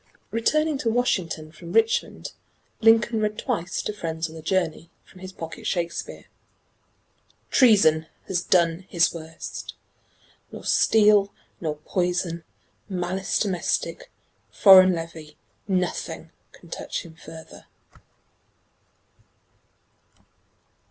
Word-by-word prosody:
Returning 305 +6 +1
to 230 - 0
Washington 185 -10 -1
from 170 +2 -10
Richmond, 225 0 +1 0.5
Lincoln 225 0 +4
read 210 0 -1
twice 170 +2 -2
to 210 - -3
friends 165 -4 -3
on 160 - -12
the 160 - -9
journey, 165 -1 -1 0.2
from 185 - -17
his 185 0 -8
pocket 165 -4 -8
Shakespeare: 170 -2 -3 1.3
Treason 195 - +5 0.2
has 180 -2 0
done 175 0 +1
his 170 0 +2
worst; 160 -1 -8 0.8
nor - - -9
steel 210 -2 +4 0.3
nor 155 -3 -3
poison, 175 +1 -2 0.5
Malice 185 +1 -2
domestic, 205 - -2 0.4
foreign 185 -2 +7
levy, 165 -2 -8 0.3
nothing, 185 -2 -2 0.2
Can - - -17
touch - - -5
him 165 - -12
further. 160 0 -13
180 Hz, 100 wpm, -24 LUFS, 165-210 Hz, 1.3 s, foreign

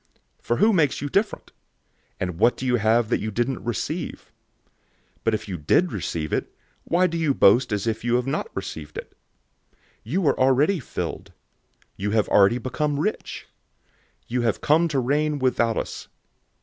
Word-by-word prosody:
004:007 - - -33
For 120 - +2
who 215 - +4
makes 155 -7 +2
you 145 - -4
different? 200 +8 -1 0.7
And 90 -2 -3
what 120 +3 +4
do 130 - -5
you 125 -1 +2
have 110 +1 +2
that - - +1
you 110 - -3
didn't 120 +4 -2
receive? 115 -6 -4 0.9
But 115 - +2
if 105 - -6
you 95 -3 -4
did 165 - +2
receive 80 -2 -3
it, - - -2 0.3
why 175 +2 +2
do 170 -2 -1
you 150 -4 +1
boast 120 +5 +5
as 105 0 -1
if 115 -1 -2
you 120 0 +1
had 125 0 +1
not 135 - -2
received 75 -1 -6
it? - - -7 0.6
004:008 - - -37 0.3
You 170 - -1
are 140 - +2
already 135 +8 +3
filled. 130 - -5 0.6
You 100 +1 -2
have 105 - +2
already 100 +4 +5
become 145 +3 -2
rich. 210 +8 -3 0.8
You 125 +1 -1
have 115 -3 0
come 160 +3 +3
to 150 -4 -2
reign 145 +4 +1
without 120 -4 +1
us. - - -5
125 Hz, 175 wpm, -24 LUFS, 110-150 Hz, 0.9 s, boast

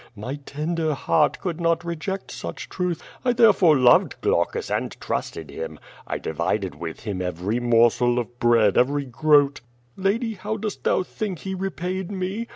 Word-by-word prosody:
My 125 +7 -5
tender 155 +1 -1
heart 150 +2 +2
could 175 -3 -4
not 165 0 +1
reject 170 +4 -4
such - - -7
truth. 180 -3 -2 0.2
1 245 -1 +1
therefore 200 - +6
loved 125 -2 +5
Qlaucus - - 0
and - - -4
trusted - - -4
him. 80 -1 -6 0.3
I - - -2
divided 85 +4 -2
with 80 +2 -7
him 100 -4 -4
every 90 +6 -2
morsel 120 0 +3
of 120 0 -4
bread, 115 -4 +4
every 140 +3 +2
groat. 145 +2 +3 0.3
Lady 220 +4 0
how 210 +2 -4
dost 215 -1 -5
thou - - +3
think 200 -1 -4
he 190 - -2
repaid 185 -1 -3
me? 200 +4 -3
155 Hz, 160 wpm, -24 LUFS, 120-190 Hz, 0.3 s, therefore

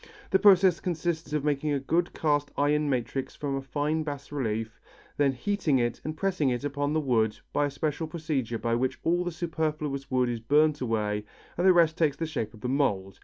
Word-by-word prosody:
The 190 - +4
process 190 -3 +6
consists 165 -3 -2
of 150 -2 -1
making 150 0 0
a 140 - +1
good 165 +6 0
cast 145 -2 0
iron 150 +1 +2
matrix 130 +1 -2
from 140 -2 -3
a 135 - -2
fine 145 +4 -1
bas 145 -3 -6
relief, 110 -5 -3 0.4
then 145 -1 +3
heating 150 +2 0
it 120 -1 -1
and 155 +1 -5
pressing 180 -7 +1
it 125 +1 -2
upon 145 0 -1
the 155 - +2
wood 115 -7 +1 0.2
by 145 0 +2
a - - -4
special 150 +3 -2
procedure 150 -8 -2
by 115 +1 -1
which 125 +2 0
all 175 +2 +2
the 175 - -3
superfluous 155 -4 -3
wood 125 -1 +2
is 120 -1 -2
burnt 150 +5 +3
away 105 -3 -1 0.3
and 180 +2 +2
the - - +9
rest 165 -2 +3
takes 150 -4 +2
the 165 - -2
shape 120 -8 -4
of 110 - -16
the 125 - -3
mould. 105 -8 0
145 Hz, 210 wpm, -28 LUFS, 130-160 Hz, 0.4 s, the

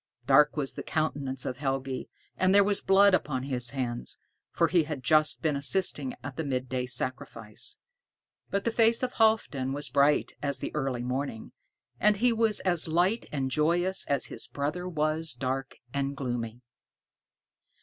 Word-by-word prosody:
Dark 150 +4 +5
was 140 -2 -1
the - - -6
countenance 140 -4 -2
of 125 - -3
Helgi, 135 -1 -3 0.3
and 185 +1 +3
there 200 - +7
was 200 0 +1
blood 195 +1 +5
upon 130 -8 0
his 125 -3 -2
hands, 125 -3 -3 0.3
for 170 - +2
he 165 -1 +3
had 145 -4 -5
just 155 +3 +3
been 155 -3 +1
assisting 140 -2 -1
at 140 -1 -7
the 160 - -1
midday 130 -2 -2
sacrifice. 125 - -2 0.7
But 200 0 -1
the 230 - 0
face 230 +1 +3
of 250 - -1
Halfdan 210 - +2
was 145 +1 -2
bright 145 +1 +3
as 140 -1 -1
the - - -5
early 135 -5 -2
morning, 125 -2 -4 0.5
and 210 0 +4
he 240 +3 +3
was 225 -2 +2
as 175 -4 +2
light 180 +8 +1
and 135 -3 -2
joyous 175 +6 +1
as 140 - +1
his - - -6
brother 155 +6 -3
was 155 -2 -1
dark 135 +2 -3 0.2
and 140 0 -2
gloomy. 120 -3 -4
145 Hz, 160 wpm, -28 LUFS, 130-180 Hz, 0.7 s, there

